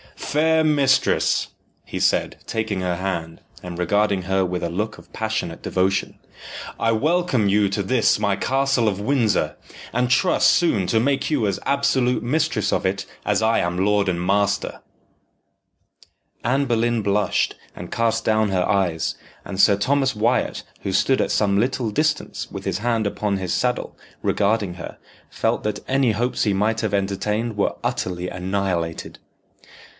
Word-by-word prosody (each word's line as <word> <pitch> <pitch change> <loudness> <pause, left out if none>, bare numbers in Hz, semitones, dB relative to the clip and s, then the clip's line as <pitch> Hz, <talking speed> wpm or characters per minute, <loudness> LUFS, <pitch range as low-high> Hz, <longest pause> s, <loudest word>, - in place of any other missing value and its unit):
"Fair 160 +2 +2
mistress," 140 -4 +2 0.3
he - - -6
said, - - +1
taking 110 -3 -2
her 90 -1 -1
hand, 85 -3 -4 0.2
and 90 -1 -7
regarding 100 +2 +1
her 95 +1 +1
with 90 0 -3
a 85 - -1
look 105 +6 -3
of - - -17
passionate 110 -6 -3
devotion, 95 +1 0 0.6
"I 115 0 +2
welcome 155 - +1
you 105 +1 +3
to 100 +1 -1
this 120 +3 +2
my 100 -2 +1
castle 135 0 +1
of 100 -2 0
Windsor, 105 - +1 0.4
and 125 +1 +1
trust 155 +8 +4
soon 110 - +2
to 110 +3 +2
make 140 +2 0
you 145 -8 +1
as 100 -2 -1
absolute 130 -3 +1
mistress 150 +7 0
of - - 0
it 100 +1 -1 0.2
as - - +1
I 110 +1 +3
am 85 +2 0
lord 105 -1 +2
and 90 -1 -1
master." 100 +1 0 1.7
Anne 135 +4 +2
Boleyn 120 -1 +1
blushed, 100 +1 +1 0.2
and - - -9
cast 115 0 0
down 110 -1 +2
her 95 -2 +1
eyes, 90 -4 0 0.3
and 95 -1 -6
Sir 100 0 +6
Thomas 135 +4 +1
Wyat, 115 +4 0 0.2
who 95 - -3
stood 130 +7 +2
at - - +1
some 100 -2 +2
little 120 -1 0
distance 155 +6 -1
with - - -7
his - - -1
hand 115 -1 0
upon 100 0 -1
his 95 -2 -2
saddle, 125 0 -1 0.3
regarding 100 -3 +1
her, 90 - -8 0.3
felt - - -1
that 105 -1 -2
any 130 -3 +2
hopes 120 +4 -1
he 105 - +2
might 110 +3 +1
have 110 -3 -2
entertained 105 +3 -1
were 100 - 0
utterly 90 0 -2
annihilated. 90 -2 -3
105 Hz, 160 wpm, -22 LUFS, 95-125 Hz, 1.7 s, Sir